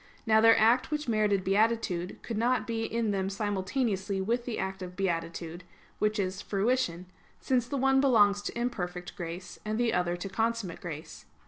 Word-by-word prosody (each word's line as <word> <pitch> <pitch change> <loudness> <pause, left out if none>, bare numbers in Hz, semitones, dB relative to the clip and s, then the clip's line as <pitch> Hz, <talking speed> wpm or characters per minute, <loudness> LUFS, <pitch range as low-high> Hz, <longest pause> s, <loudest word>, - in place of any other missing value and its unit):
Now 220 -1 +5
their 225 0 +7
act 235 +4 +4
which 300 -2 -2
merited 210 -4 +2
beatitude 195 -3 +1
could 230 - -4
not 245 +2 +2
be 225 -1 -2
in 230 -2 -1
them 195 -1 -1
simultaneously 200 0 -1
with 235 +5 -1
the 240 - -3
act 190 0 -3
of 180 0 -7
beatitude, 170 -2 -3 0.4
which 215 +1 +1
is 190 0 -2
fruition; 205 -4 0 0.3
since 250 -2 +1
the 280 - -2
one 270 0 +4
belongs 205 -7 +4
to 205 - -5
imperfect 180 -7 -3
grace, 175 -1 -7
and 215 +1 -2
the 240 -1 +2
other 175 0 0
to 175 - -5
consummate 225 -2 -2
grace. 160 -3 -8
205 Hz, 175 wpm, -29 LUFS, 185-230 Hz, 0.4 s, their